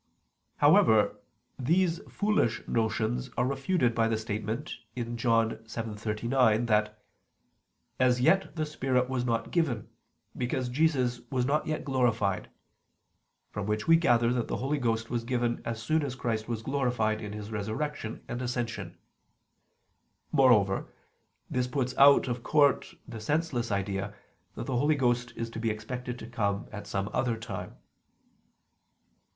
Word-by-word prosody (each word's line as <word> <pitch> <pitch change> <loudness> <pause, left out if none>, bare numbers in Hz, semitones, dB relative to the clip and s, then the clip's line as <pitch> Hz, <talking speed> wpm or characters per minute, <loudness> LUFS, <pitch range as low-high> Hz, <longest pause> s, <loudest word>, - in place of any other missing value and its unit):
However, - - +5 0.4
these 170 +5 +2
foolish 205 - 0
notions 115 +2 0
are - - +2
refuted 135 -1 +1
by 115 -1 +2
the 115 -1 0
statement 110 +4 -4 0.2
(John 115 -2 +1
7:39) 115 +1 0
that 105 -2 0 1.0
"as 125 -1 +3
yet 190 +10 +3
the 155 -1 -1
Spirit 130 -4 0
was 125 -2 -1
not 115 -2 -1
given, 145 - 0 0.5
because 125 0 -2
Jesus 130 -4 +1
was 130 -3 0
not 150 +3 +1
yet 155 0 -2
glorified"; 115 -8 +1 1.0
from 105 -1 -4
which 105 0 -1
we 165 - +7
gather 120 -8 +3
that 120 -3 -1
the - - -2
Holy 140 +3 -1
Ghost 115 -2 -1
was 120 -2 -1
given 120 -1 -1
as 115 -1 -3
soon 155 +8 +1
as 140 -3 -3
Christ 110 -4 -2
was 115 -2 -3
glorified 125 -6 0
in 105 -1 -6
His 105 0 -7
Resurrection 110 +3 -4
and 120 +1 -4
Ascension. 115 -8 -3 1.3
Moreover, 105 -8 +4 0.6
this 125 -1 -1
puts 130 -1 -2
out 140 0 +7
of 120 -1 -2
court 145 +1 +2
the 115 - -7
senseless 135 -3 -1
idea 100 0 -2 0.4
that 115 - -5
the 130 -2 -1
Holy 150 +5 +3
Ghost 120 -2 +1
is 115 0 -4
to 115 - -6
be 115 0 0
expected 125 +3 -5
to 110 - -8
come 100 -4 -1
at 105 -1 -7
some 100 0 -2
other 120 -3 0
time. 110 -4 -7
120 Hz, 140 wpm, -29 LUFS, 110-130 Hz, 1.3 s, we